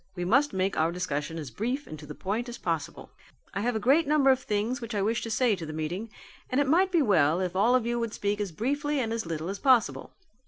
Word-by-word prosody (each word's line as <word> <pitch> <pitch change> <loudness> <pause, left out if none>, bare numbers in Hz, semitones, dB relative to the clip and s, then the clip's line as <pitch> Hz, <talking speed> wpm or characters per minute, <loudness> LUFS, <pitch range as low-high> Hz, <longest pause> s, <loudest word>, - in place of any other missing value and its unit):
We 175 -1 -3
must 275 +9 +3
make 190 +1 -1
our 160 +1 +2
discussion 165 -3 -3
as 150 -6 -6
brief 250 - -2
and 155 - -9
to 150 - -11
the 150 - -8
point 225 +6 -3
as 240 - -7
possible. 165 -4 -4 0.4
I 200 - -2
have 240 +2 0
a - - 0
great 275 +9 +3
number 285 -2 +4
of 260 - +2
things 220 +1 -2
which 230 -1 -5
I 200 - +1
wish 225 +3 0
to 230 - -5
say 225 0 +2
to 180 - -8
the 155 -1 -6
meeting 170 +8 -4 0.4
and 255 - +1
it 285 - +3
might 365 +6 +3
be 335 -4 +3
well 165 - +3
if 185 -1 -2
all 225 +6 +4
of 250 -3 +1
you 240 0 -1
would 230 -2 -3
speak 205 +1 -1
as 200 -3 -3
briefly 285 - -1
and 225 -3 -1
as 230 -6 -3
little 160 0 -3
as 195 +1 -4
possible. 255 -4 +2
215 Hz, 265 wpm, -28 LUFS, 180-255 Hz, 0.4 s, number